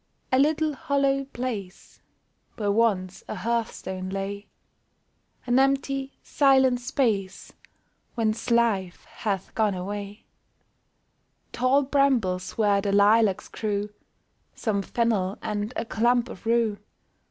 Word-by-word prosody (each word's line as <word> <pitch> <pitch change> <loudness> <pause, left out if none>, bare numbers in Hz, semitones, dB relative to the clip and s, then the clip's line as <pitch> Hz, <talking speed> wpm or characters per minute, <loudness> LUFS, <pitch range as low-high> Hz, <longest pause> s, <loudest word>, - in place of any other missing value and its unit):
A 260 - +4
little 310 +2 +2
hollow 275 0 0
place 235 -8 -6 0.5
Where 205 -2 0
once 200 -4 0
a - - -4
hearthstone 190 -3 -3
lay; 195 +1 -4 1.0
An 245 +1 +3
empty, 275 0 0
silent 265 -3 +3
space 225 -8 -1 0.6
Whence 225 -1 -1
life 220 -6 +1
hath 195 -3 -4
gone 215 -3 +1
away; 200 +3 -6 1.3
Tall 255 +3 +2
brambles 250 -10 +1
where 205 -2 +3
the 200 0 -1
lilacs 205 0 +4
grew, 210 -1 -3 0.6
Some 210 -4 -1
fennel, 205 -3 0
and 210 0 -3
a - - -2
clump 235 +2 +1
of 225 - -10
rue. 230 -3 +1
220 Hz, 105 wpm, -25 LUFS, 200-255 Hz, 1.3 s, A